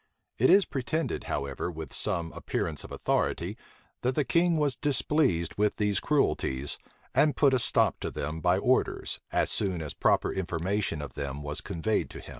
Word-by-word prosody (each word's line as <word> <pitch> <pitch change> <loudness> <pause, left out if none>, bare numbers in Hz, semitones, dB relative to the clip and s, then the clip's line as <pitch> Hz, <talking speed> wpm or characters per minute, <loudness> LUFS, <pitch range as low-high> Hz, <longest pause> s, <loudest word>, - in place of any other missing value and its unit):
It - - +5
is 200 0 +7
pretended, 155 +4 -2
however, 70 +4 -3
with 80 -4 -7
some 85 -1 -1
appearance 80 -3 -3
of - - -11
authority, - - -1 0.5
that 125 +1 0
the 150 - +2
king 170 +2 +3
was 145 -4 +1
displeased 130 - +1
with 105 0 +2
these 105 -2 +1
cruelties, 70 - 0 0.3
and 150 -1 +3
put 140 -3 +5
a 130 - +4
stop 120 - +2
to - - -3
them 75 +3 -4
by 90 +2 +3
orders, 125 +6 +1
as - - +2
soon 95 -4 0
as 75 -2 -5
proper - - +2
information 90 -2 -1
of 70 - -8
them 70 0 -4
was 75 +1 -3
conveyed 100 +2 -1
to - - -9
him. - - -11
95 Hz, 175 wpm, -29 LUFS, 80-135 Hz, 0.5 s, is